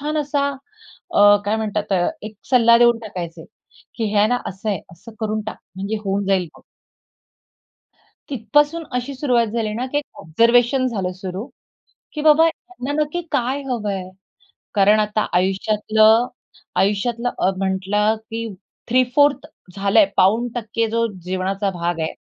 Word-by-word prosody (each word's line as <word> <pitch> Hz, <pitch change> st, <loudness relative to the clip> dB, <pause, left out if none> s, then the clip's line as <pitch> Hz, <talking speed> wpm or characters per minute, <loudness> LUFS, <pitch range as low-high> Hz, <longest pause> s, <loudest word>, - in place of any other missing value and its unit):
छान 300 Hz, +2 st, -2 dB
असा 285 Hz, -1 st, 0 dB, 0.7 s
अ 205 Hz, -4 st, +7 dB
काय 210 Hz, +2 st, 0 dB
म्हणतात? 210 Hz, -2 st, -2 dB
अ, 175 Hz, -2 st, +2 dB
एक 215 Hz, 0 st, -8 dB, 0.2 s
सल्ला 235 Hz, -2 st, +6 dB
देऊन 235 Hz, -1 st, +5 dB
टाकायचे, 175 Hz, -7 st, -7 dB, 0.5 s
की 230 Hz, -, -2 dB
"हे -, -, -1 dB
आहे 210 Hz, -, +5 dB
ना, 245 Hz, -, +2 dB
असं 195 Hz, +3 st, -6 dB
आहे, 195 Hz, -5 st, -2 dB
असं 220 Hz, +7 st, -14 dB
करून 215 Hz, 0 st, -1 dB
टाक. -, -, -5 dB, 0.2 s
म्हणजे 200 Hz, +3 st, -3 dB
होऊन 195 Hz, +1 st, -1 dB
जाईल 190 Hz, -3 st, +1 dB
बघ." -, -, -18 dB, 1.7 s
तिथपासून 295 Hz, +7 st, +1 dB
अशी 250 Hz, +3 st, -3 dB
सुरुवात 250 Hz, -4 st, +1 dB
झाली 215 Hz, -1 st, -2 dB
ना, 250 Hz, +3 st, -2 dB
की 290 Hz, +3 st, -1 dB
एक 290 Hz, -, -4 dB, 0.2 s
ऑब्झर्वेशन 240 Hz, -, +3 dB
झालं 195 Hz, -6 st, -2 dB
सुरु, 190 Hz, +4 st, -6 dB, 0.7 s
की 305 Hz, -, -4 dB
बाबा, 310 Hz, +1 st, +6 dB
यांना 330 Hz, -5 st, -6 dB
नक्की 305 Hz, +4 st, -2 dB
काय 270 Hz, +1 st, 0 dB
हवंय? 205 Hz, -6 st, -3 dB, 0.6 s
कारण 210 Hz, +1 st, +4 dB
आता 210 Hz, 0 st, 0 dB
आयुष्यातलं 215 Hz, +4 st, +3 dB, 0.5 s
आयुष्यातलं 230 Hz, +5 st, 0 dB
अ, 185 Hz, -, +3 dB
म्हटलं 195 Hz, +3 st, 0 dB, 0.2 s
की 230 Hz, 0 st, -3 dB, 0.4 s
3/4 255 Hz, +4 st, +3 dB, 0.3 s
झालंय 200 Hz, +1 st, +4 dB
पाऊण 220 Hz, +6 st, +3 dB
टक्के 230 Hz, 0 st, -1 dB
जो 230 Hz, 0 st, +1 dB, 0.2 s
जीवनाचा 190 Hz, +2 st, -2 dB
भाग 170 Hz, -1 st, -3 dB
आहे 160 Hz, -, -2 dB
220 Hz, 145 wpm, -20 LUFS, 195-245 Hz, 1.7 s, अ